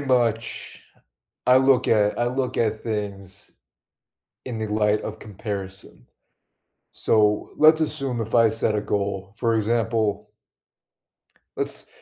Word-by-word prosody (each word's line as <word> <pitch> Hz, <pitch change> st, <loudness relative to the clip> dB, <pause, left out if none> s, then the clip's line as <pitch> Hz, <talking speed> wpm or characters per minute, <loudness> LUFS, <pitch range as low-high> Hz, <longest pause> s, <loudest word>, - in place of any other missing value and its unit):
much 120 Hz, -4 st, -1 dB, 0.6 s
I 125 Hz, -, +7 dB
look 135 Hz, -1 st, +3 dB
at 105 Hz, -2 st, +3 dB
I 120 Hz, -, +1 dB
look 130 Hz, +1 st, -2 dB
at 110 Hz, -1 st, 0 dB
things 100 Hz, -2 st, -4 dB, 0.9 s
in 120 Hz, -3 st, -5 dB
the 110 Hz, -, -2 dB
light 105 Hz, 0 st, +2 dB
of 110 Hz, 0 st, -6 dB
comparison, 100 Hz, -, -7 dB, 0.9 s
so, 105 Hz, -1 st, +2 dB
let's 155 Hz, +1 st, +6 dB
assume 135 Hz, -6 st, -2 dB
if 110 Hz, 0 st, -6 dB
I 115 Hz, -1 st, +6 dB
set 110 Hz, 0 st, 0 dB
a 105 Hz, -, +1 dB
goal, 100 Hz, -1 st, -3 dB
for 115 Hz, -1 st, +1 dB
example 110 Hz, -2 st, 0 dB, 1.3 s
let's -, -, -2 dB
110 Hz, 120 wpm, -24 LUFS, 105-120 Hz, 1.3 s, I